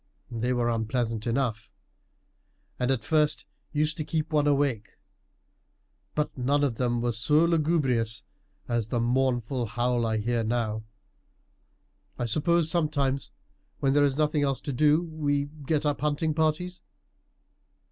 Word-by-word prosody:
They 120 Hz, +2 st, -1 dB
were 120 Hz, -1 st, +1 dB
unpleasant 115 Hz, 0 st, -1 dB
enough, 120 Hz, -2 st, -1 dB, 1.1 s
and 125 Hz, -, 0 dB
at 130 Hz, -5 st, 0 dB
first 150 Hz, +1 st, +1 dB, 0.3 s
used 155 Hz, +2 st, 0 dB
to 155 Hz, -, -2 dB
keep 160 Hz, +1 st, -2 dB
one 150 Hz, -1 st, +3 dB
awake; 140 Hz, -7 st, 0 dB, 1.2 s
but 150 Hz, 0 st, -1 dB
none 140 Hz, +3 st, +1 dB
of 125 Hz, -6 st, 0 dB
them 120 Hz, -2 st, 0 dB
were 120 Hz, -, +1 dB
so 150 Hz, +8 st, +3 dB
lugubrious 145 Hz, -9 st, +1 dB, 0.4 s
as 120 Hz, -3 st, -1 dB
that 120 Hz, +1 st, -1 dB
mournful 120 Hz, 0 st, 0 dB
howl 120 Hz, +2 st, 0 dB
I 110 Hz, 0 st, 0 dB
hear 115 Hz, +2 st, 0 dB
now. 110 Hz, -1 st, -1 dB, 1.3 s
I 120 Hz, -, -1 dB
suppose 155 Hz, +7 st, +2 dB
sometimes, 150 Hz, -5 st, 0 dB, 0.5 s
when 135 Hz, -1 st, +2 dB
there 145 Hz, 0 st, +4 dB
is 140 Hz, -1 st, +1 dB
nothing 150 Hz, -1 st, +2 dB
else 135 Hz, -3 st, +1 dB
to 140 Hz, -, -4 dB
do, 150 Hz, +5 st, +4 dB
we 145 Hz, -4 st, -1 dB, 0.2 s
get 155 Hz, -1 st, +1 dB
up 145 Hz, -1 st, 0 dB
hunting 150 Hz, +1 st, 0 dB
parties?" 160 Hz, +3 st, -1 dB
135 Hz, 135 wpm, -27 LUFS, 120-150 Hz, 1.3 s, there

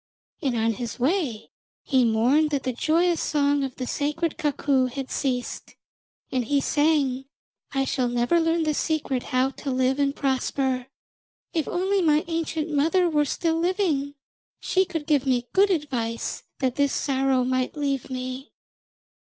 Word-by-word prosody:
And 255 Hz, -4 st, 0 dB
on 225 Hz, 0 st, +2 dB
his 230 Hz, 0 st, -5 dB
way 260 Hz, -, -1 dB, 0.3 s
he 260 Hz, -3 st, +3 dB
mourned 245 Hz, +7 st, +3 dB
that 285 Hz, -3 st, -1 dB
the 255 Hz, -, -1 dB
joyous 335 Hz, +6 st, +2 dB
song 285 Hz, -2 st, +1 dB
of 265 Hz, -2 st, -4 dB
the 255 Hz, -, -4 dB
sacred 295 Hz, +5 st, -1 dB
cuckoo 275 Hz, -3 st, +1 dB
had 265 Hz, +1 st, -6 dB
ceased, 250 Hz, -3 st, -3 dB, 0.6 s
and 255 Hz, -1 st, 0 dB
he 285 Hz, +4 st, +2 dB
sang: 280 Hz, -3 st, +1 dB, 0.5 s
'I 270 Hz, 0 st, +1 dB
shall 255 Hz, -2 st, 0 dB
never 245 Hz, +8 st, +2 dB
learn 330 Hz, 0 st, +1 dB
the 310 Hz, -1 st, +1 dB
secret 290 Hz, -4 st, -1 dB
how 255 Hz, +2 st, 0 dB
to 280 Hz, -, -6 dB
live 260 Hz, +1 st, +1 dB
and 280 Hz, 0 st, +1 dB
prosper. 265 Hz, -1 st, -1 dB, 0.7 s
If 320 Hz, -3 st, 0 dB
only 380 Hz, +2 st, +1 dB
my 310 Hz, -2 st, +3 dB
ancient 325 Hz, -1 st, -2 dB
mother 325 Hz, +5 st, +3 dB
were 295 Hz, -1 st, +2 dB
still 325 Hz, +2 st, 0 dB
living, 330 Hz, -6 st, 0 dB, 0.4 s
she 375 Hz, 0 st, +1 dB
could 325 Hz, -4 st, -4 dB
give 285 Hz, -3 st, +2 dB
me 245 Hz, -2 st, +1 dB
good 395 Hz, +1 st, +5 dB
advice 255 Hz, -10 st, -2 dB
that 260 Hz, -2 st, -1 dB
this 285 Hz, -1 st, +2 dB
sorrow 265 Hz, -2 st, +1 dB
might 255 Hz, +3 st, -1 dB
leave 275 Hz, -3 st, -1 dB
me.' 255 Hz, +2 st, -5 dB
280 Hz, 155 wpm, -25 LUFS, 255-315 Hz, 0.7 s, good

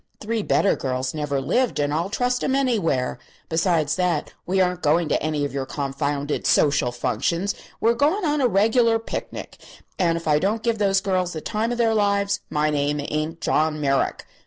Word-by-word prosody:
Three 225 Hz, +1 st, -2 dB
better 200 Hz, -, +2 dB
girls 130 Hz, -1 st, -2 dB
never 145 Hz, -3 st, -2 dB
lived, 215 Hz, -, 0 dB
and 145 Hz, 0 st, 0 dB
I'll 170 Hz, +5 st, -1 dB
trust 250 Hz, +3 st, 0 dB
'em 265 Hz, -, +1 dB
anywhere. 200 Hz, -, 0 dB, 0.3 s
Besides 160 Hz, -2 st, +1 dB
that, 175 Hz, -4 st, 0 dB
we 190 Hz, +2 st, +1 dB
aren't 180 Hz, -1 st, +1 dB
going 155 Hz, +3 st, +2 dB
to -, -, +1 dB
any 150 Hz, -1 st, -1 dB
of 140 Hz, -, -5 dB
your 135 Hz, -1 st, -3 dB
confounded 145 Hz, +1 st, -2 dB
social 140 Hz, -4 st, +3 dB
functions; 165 Hz, -, -1 dB, 0.3 s
we're 230 Hz, +1 st, +3 dB
going 305 Hz, -, +1 dB
on 295 Hz, -1 st, +1 dB
a 255 Hz, -, +4 dB
reg'lar 225 Hz, +3 st, +3 dB
picnic, 225 Hz, -, -6 dB, 0.4 s
and 170 Hz, -3 st, +2 dB
if 165 Hz, -, -7 dB
I 150 Hz, -1 st, +4 dB
don't 215 Hz, +6 st, -1 dB
give 230 Hz, -2 st, 0 dB
those 195 Hz, -2 st, +2 dB
girls 185 Hz, -2 st, -1 dB
the 160 Hz, -, -4 dB
time 225 Hz, +5 st, -2 dB
of 240 Hz, -, -2 dB
their 230 Hz, -2 st, +2 dB
lives 200 Hz, -1 st, +1 dB
my 150 Hz, 0 st, +1 dB
name 145 Hz, 0 st, 0 dB
ain't 155 Hz, +2 st, -3 dB
John 155 Hz, 0 st, +1 dB
Merrick. 135 Hz, -2 st, 0 dB
175 Hz, 185 wpm, -23 LUFS, 150-220 Hz, 0.4 s, a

